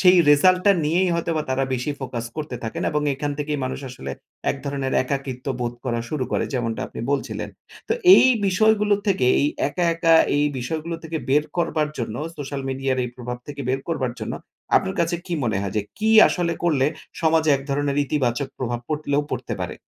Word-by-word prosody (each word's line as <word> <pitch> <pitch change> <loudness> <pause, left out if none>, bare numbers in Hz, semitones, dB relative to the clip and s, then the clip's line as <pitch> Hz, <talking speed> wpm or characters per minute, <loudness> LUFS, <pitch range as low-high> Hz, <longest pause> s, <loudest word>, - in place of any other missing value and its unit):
সেই 185 0 +7
রেজাল্টটা 185 +6 +5
নিয়েই 175 +4 +2
হয়তোবা 165 -2 -1
তারা 135 +1 +1
বেশি 125 +4 -2
ফোকাস 120 -3 -4
করতে 150 -5 -4
থাকেন। 110 - -4
এবং 150 0 0
এখান 145 +2 -3
থেকেই 145 0 -2
মানুষ 130 - -4
আসলে 70 - -7 0.4
এক - - -3
ধরনের 140 -2 -2
একাকিত্ব 130 -1 -4
বোধ 120 0 -1
করা 120 -2 -1
শুরু 145 -4 -2
করে। - - +1
যেমনটা 115 -3 -1
আপনি - - -8
বলছিলেন। 140 - -2 0.4
তো - - +2 0.2
এই - - +7 0.2
বিষয়গুলো 210 +2 +3
থেকে 185 -11 +2
এই 145 - +3 0.2
একা, 175 +4 -1
একা 165 0 +4 0.2
এই 145 - +3
বিষয়গুলো 160 +6 -3
থেকে 160 0 -4
বের 145 +3 +3
করবার 155 -3 0
জন্য, 115 -2 -3 0.2
সোশ্যাল 140 -1 -5
মিডিয়ার 135 0 -1
এই 125 - -3
প্রভাব 125 -1 -5
থেকে 145 -1 -7
বের 130 +1 0
করবার 130 -7 -1
জন্য, - - -4 0.4
আপনার 95 - 0
কাছে 170 +1 +1
কি 180 - -5
মনে 110 -4 0
হয় 100 -1 -3
যে 105 - +2 0.2
কি 220 +1 +1 0.2
আসলে 175 -2 0
করলে 145 -5 +3 0.3
সমাজে 160 -1 +3
এক 135 - -8
ধরনের 140 0 0
ইতিবাচক 130 -1 0
প্রভাব 120 -2 -2
পরলেও 150 -1 0
পড়তে 130 0 -3
পারে? - - -5
145 Hz, 185 wpm, -23 LUFS, 130-165 Hz, 0.4 s, সেই